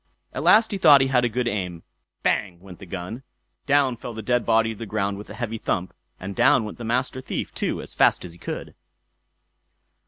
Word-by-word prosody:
At - - -3
last 220 +1 +5
he 200 - -3
thought 145 -6 +7
he 135 - +1
had 125 -2 +3
a 120 - +2
good 125 +1 -1
aim; 90 -6 -3 0.4
"bang" 90 -4 0
went 90 -1 -13
the 95 - -11
gun, 95 +7 -6 0.5
down 140 -3 +3
fell 115 0 -7
the 110 - -6
dead 120 +1 0
body 115 0 +3
to 105 - -14
the 115 - -6
ground 100 -1 -2
with 105 - -10
a - - -8
heavy 115 -2 -4
thump, 90 -2 -2 0.3
and 95 +1 -6
down 135 +1 +4
went 105 - -8
the - - -6
Master 125 +3 -1
Thief - - -4
too - - -2
as - - -9
fast - - +3
as 85 - -9
he 85 - -17
could. - - -6
115 Hz, 220 wpm, -24 LUFS, 100-125 Hz, 0.5 s, thought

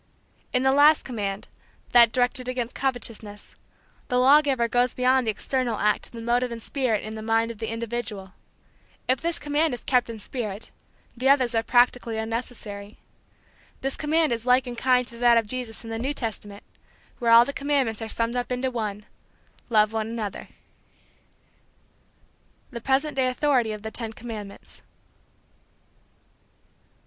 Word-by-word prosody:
In 250 0 +1
the 265 - +4
last 290 +3 +5
command, 205 -5 -4 0.4
that 235 -2 +7
directed 250 0 0
against 250 -2 -3
covetousness, 230 -6 -4 0.5
the 250 - 0
law 275 +4 +7
giver 265 -5 0
goes 245 +1 +1
beyond 255 -1 +2
the - - +3
external 240 +1 -2
act 210 +1 +1
to - - -14
the 230 -1 -8
motive 240 +1 +1
and 230 - -5
spirit 235 -3 -1
in 215 - -6
the 220 - -6
mind 225 +1 +1
of 225 - -12
the 225 - -3
individual. 225 -4 -5 0.7
If 260 +1 +1
this 335 0 -1
command 295 -2 0
is 240 - -12
kept 250 -2 +2
in 225 -1 -6
spirit, 215 -2 -6 0.4
the 255 +3 +1
others 260 -4 +4
are 225 - +2
practically 240 -1 +2
unnecessary. 220 -2 -5 0.8
This 270 0 -2
command 310 -2 +1
is 230 -1 -4
like 250 +1 +3
in 245 -1 -6
kind 250 +1 +2
to 235 -1 -10
that 240 -1 +5
of 230 - +2
Jesus 240 0 -5
in 225 - -8
the 225 - -3
New 275 +5 -2
Testament, 210 -4 -5 0.6
where 235 - 0
all 230 +1 +8
the 280 - -4
commandments 270 -6 0
are 225 - -4
summed 230 +2 -2
up 245 0 -2
into 255 +1 -1
one: 210 -3 -4 0.6
"Love 215 -1 +3
one 220 -1 -1
another." 225 -3 -5
VI. - - -27 2.2
THE 235 -2 -6
PRESENT 270 +4 +1
DAY 260 -1 +2
AUTHORITY 255 -3 +1
OF 210 0 -7
THE 220 - -5
TEN 225 -1 -3
COMMANDMENTS. 215 -4 -9
240 Hz, 165 wpm, -25 LUFS, 225-255 Hz, 2.2 s, all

